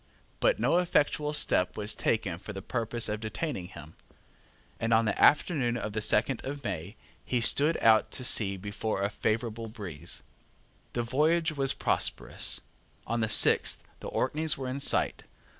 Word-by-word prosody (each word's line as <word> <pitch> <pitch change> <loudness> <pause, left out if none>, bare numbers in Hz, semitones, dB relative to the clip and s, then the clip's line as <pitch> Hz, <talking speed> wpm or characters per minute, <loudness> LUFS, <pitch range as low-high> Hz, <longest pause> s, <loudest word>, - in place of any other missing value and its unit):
But - - +2
no 175 - +2
effectual 150 -3 +1
step 90 -10 +2
was 105 0 0
taken 95 -7 -1
for 105 - -9
the 95 - -7
purpose 115 0 -1
of 105 0 -3
detaining 110 - -4
him; 80 -3 -12 0.9
and 115 0 +2
on 115 0 +3
the 110 - 0
afternoon 140 -6 +3
of 105 -3 -5
the 110 - -2
second 115 +4 +1
of 140 +1 -6
May 95 -1 -5 0.3
he 125 - -1
stood 145 +7 +3
out 110 -1 +4
to 130 - -3
sea 100 -5 +3
before 105 +1 -3
a 100 - -1
favourable 115 +2 -2
breeze. 95 -9 -5 0.7
The 120 - -1
voyage 160 +7 +1
was 135 -3 +3
prosperous. - - 0 0.4
On 115 - -2
the 110 -1 0
sixth - - +4 0.2
the - - -8
Orkneys 155 0 +1
were 135 -1 -5
in 130 +2 -4
sight. - - +1
115 Hz, 160 wpm, -28 LUFS, 105-140 Hz, 0.9 s, out